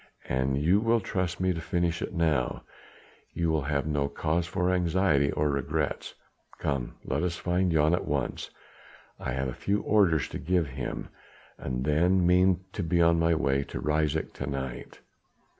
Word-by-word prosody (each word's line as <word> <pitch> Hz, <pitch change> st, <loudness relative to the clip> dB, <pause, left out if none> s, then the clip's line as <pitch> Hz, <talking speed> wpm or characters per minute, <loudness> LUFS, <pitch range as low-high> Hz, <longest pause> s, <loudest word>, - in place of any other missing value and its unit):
An 65 Hz, +1 st, 0 dB
you 80 Hz, +8 st, +3 dB
will 115 Hz, +1 st, +2 dB
trust 95 Hz, -4 st, -2 dB
me 95 Hz, 0 st, +2 dB
to 85 Hz, -, -5 dB
finish 85 Hz, 0 st, -1 dB
it -, -, -3 dB
now; 80 Hz, -8 st, 0 dB, 0.7 s
you'll 80 Hz, -2 st, +1 dB
have 70 Hz, 0 st, -1 dB
no 75 Hz, -2 st, 0 dB
cause 80 Hz, +4 st, -1 dB
for 90 Hz, 0 st, 0 dB
anxiety 85 Hz, -5 st, +2 dB
or 75 Hz, -1 st, +1 dB
regrets. 70 Hz, -2 st, -2 dB, 0.4 s
Come! 70 Hz, -4 st, -2 dB
let 70 Hz, +3 st, -1 dB
us 90 Hz, -1 st, -1 dB
find 90 Hz, +1 st, 0 dB
Jan 80 Hz, 0 st, +3 dB
at 90 Hz, -, -1 dB
once! 70 Hz, -4 st, -2 dB, 0.7 s
I 65 Hz, -, -3 dB
have 65 Hz, 0 st, -1 dB
a 65 Hz, -, -4 dB
few 100 Hz, +9 st, -1 dB
orders 95 Hz, -7 st, +3 dB
to -, -, -5 dB
give 90 Hz, -1 st, +1 dB
him, 65 Hz, -1 st, -5 dB, 0.5 s
and 65 Hz, 0 st, -3 dB
then 85 Hz, +5 st, +3 dB
mean 90 Hz, +1 st, +4 dB
to -, -, -3 dB
be 85 Hz, 0 st, +1 dB
on 85 Hz, 0 st, +4 dB
my 85 Hz, 0 st, +3 dB
way 70 Hz, 0 st, +1 dB
to -, -, -6 dB
Ryswyk 75 Hz, +1 st, 0 dB
to 65 Hz, -, -5 dB
night." 65 Hz, -2 st, -5 dB
80 Hz, 170 wpm, -28 LUFS, 70-90 Hz, 0.7 s, mean